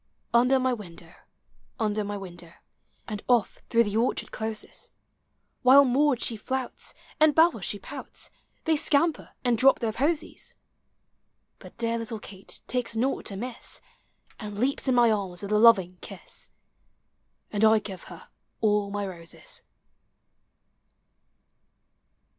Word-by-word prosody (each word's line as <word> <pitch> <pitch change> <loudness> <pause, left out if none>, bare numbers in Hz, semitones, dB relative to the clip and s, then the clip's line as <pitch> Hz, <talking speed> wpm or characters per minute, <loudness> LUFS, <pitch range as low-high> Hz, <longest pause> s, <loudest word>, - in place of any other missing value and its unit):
Under 250 +3 +5
my 255 0 +1
wiudow, 175 -6 -10 0.7
under 215 -1 0
my 205 0 -4
window, 175 -3 -10 0.5
And 210 -2 -5
oil" 240 -4 +6 0.3
through 235 0 +4
the 210 -1 -2
orchard 235 +3 0
closes; 220 -1 -5 0.7
While 275 +2 +8
Maud 270 0 +3
she 225 -3 -1
limits, 260 -1 -2 0.2
and 310 -1 +5
Bell 330 +2 +5
she - - -2
pouts, - - -6 0.3
They 320 -1 +3
scamper 310 +1 +1
and 240 -2 +2
drop 270 +2 +6
their 225 -3 -1
posies; 300 +6 -2 1.0
But - - -14
dear 230 0 -1
little 230 0 -4
Kate 195 -1 -8
takes 245 -2 -2
naught 255 +5 0
amiss. 230 +5 -6 0.6
And 210 -2 -7
leaps 265 +5 0
in 260 - +3
my 240 -2 +5
arms 195 -3 -2
with 200 - -5
a 210 - +4
loving 195 -6 +5
kiss. - - -10 1.0
And 210 0 0
1 220 0 +6
give 195 -4 -8
her - - -12 0.3
all 210 -2 +2
my 205 0 -3
roses. 170 -3 -9
225 Hz, 130 wpm, -27 LUFS, 205-255 Hz, 1.0 s, While